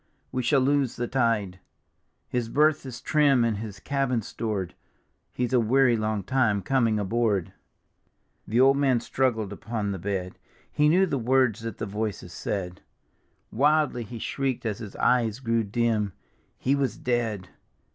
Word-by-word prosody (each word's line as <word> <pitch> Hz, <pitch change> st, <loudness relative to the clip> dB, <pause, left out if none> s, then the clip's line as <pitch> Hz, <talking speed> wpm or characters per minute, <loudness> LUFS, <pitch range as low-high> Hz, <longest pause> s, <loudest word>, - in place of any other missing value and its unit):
We 130 Hz, -, -1 dB
shall 135 Hz, +3 st, +3 dB
lose 140 Hz, -1 st, +1 dB
the 120 Hz, -, -2 dB
tide: 115 Hz, -7 st, 0 dB, 0.7 s
His 120 Hz, -2 st, -2 dB
berth 150 Hz, +1 st, +2 dB
is 125 Hz, -, -8 dB
trim 145 Hz, -5 st, +3 dB
and. 115 Hz, -3 st, 0 dB
his 105 Hz, -2 st, -7 dB
cabin 135 Hz, -2 st, -1 dB
stored, 100 Hz, -5 st, -4 dB, 0.6 s
He's 125 Hz, +1 st, -2 dB
a 125 Hz, -, +5 dB
weary 120 Hz, +2 st, +3 dB
long 110 Hz, -2 st, -1 dB
time 110 Hz, -4 st, +1 dB
coming 115 Hz, -2 st, +2 dB
aboard." 105 Hz, -3 st, 0 dB, 0.9 s
The 115 Hz, +3 st, +1 dB
old 135 Hz, +1 st, +6 dB
man 135 Hz, -3 st, +3 dB
stru^ed 115 Hz, -4 st, -1 dB
upon 105 Hz, 0 st, -3 dB
the 95 Hz, -, -4 dB
bed: 95 Hz, 0 st, -4 dB, 0.3 s
He 150 Hz, 0 st, +3 dB
knew 185 Hz, +4 st, +4 dB
the 140 Hz, -7 st, -2 dB
words 125 Hz, -2 st, +2 dB
that 115 Hz, -1 st, -6 dB
the -, -, -3 dB
voices 105 Hz, -3 st, -4 dB
said; 90 Hz, -3 st, -4 dB, 0.7 s
Wildly 145 Hz, 0 st, +2 dB
he 115 Hz, +1 st, -7 dB
shrieked 130 Hz, +2 st, -2 dB
as 105 Hz, -3 st, -2 dB
his 105 Hz, -3 st, -8 dB
eyes 115 Hz, -3 st, +2 dB
grew 115 Hz, -3 st, 0 dB
dim, 110 Hz, -2 st, 0 dB, 0.2 s
'" -, -, -39 dB
He 135 Hz, -, +1 dB
was 135 Hz, -6 st, 0 dB
dead 115 Hz, -7 st, -2 dB
115 Hz, 155 wpm, -26 LUFS, 105-130 Hz, 0.9 s, old